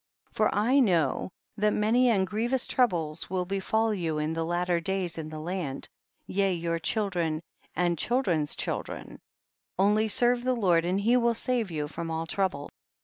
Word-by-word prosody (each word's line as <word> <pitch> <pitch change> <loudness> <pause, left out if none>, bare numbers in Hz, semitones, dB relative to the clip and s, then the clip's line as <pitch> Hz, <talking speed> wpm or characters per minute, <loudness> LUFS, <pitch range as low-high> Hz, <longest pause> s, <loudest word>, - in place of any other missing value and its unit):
20. - - -28
For - - -4
I 245 +7 +3
know 175 - +2 0.3
that 210 0 +2
many 235 +4 +3
and 195 -5 +2
grievous 235 +6 0
troubles 165 -11 0
will 185 -1 -1
befall 215 +4 0
you 165 -6 -2
in 150 +1 -1
the 165 0 -2
latter 175 +1 0
days 180 -1 -2
in 155 -1 -6
the 155 - -7
land, 160 -4 -4 0.4
yea 195 0 0
your 165 -1 -2
children 175 -5 0 0.4
and 175 -2 0
children's 175 - +1
children; - - -4 0.6
only 210 +3 +3
serve 240 +3 +3
the 255 0 +1
Lord 175 -7 +2
and 185 +3 0
he 235 +5 +3
will 235 -1 +2
save 235 -2 -1
you 150 -3 -3
from 165 +2 -6
all 160 0 -2
trouble. 180 -5 -2
185 Hz, 170 wpm, -28 LUFS, 165-220 Hz, 0.6 s, I